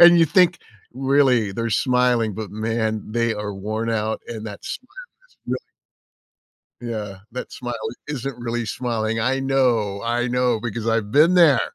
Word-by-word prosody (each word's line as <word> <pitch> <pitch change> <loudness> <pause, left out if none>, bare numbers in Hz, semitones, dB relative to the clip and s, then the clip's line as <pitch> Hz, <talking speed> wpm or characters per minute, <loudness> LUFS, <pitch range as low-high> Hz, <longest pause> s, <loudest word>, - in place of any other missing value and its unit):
and 175 0 +9
you - - +7
think, 180 +1 +4 0.4
"Really, 130 -5 +3
they're 115 +3 -2
smiling, 125 -3 +2
but, 110 0 -5
man, 110 0 -1
they 115 -1 +1
are 105 0 -4
worn 110 +4 -3
out 110 -1 -1
and 110 -2 -6
that 100 -1 -8
smile 255 - -6 0.4
is - - -30
really" - - 0 1.3
Yeah. 105 -5 -5
That 125 - -6
smile 120 -1 -5 0.3
isn't 135 -3 -4
really 120 0 -2
smiling. 115 -1 -2
I 130 +4 +1
know. 125 -7 +1
I 120 +1 0
know 125 -2 +1
because 115 0 -4
I've 115 -2 0
been 155 +6 +5
there. 155 -9 +6
115 Hz, 160 wpm, -22 LUFS, 110-130 Hz, 1.3 s, and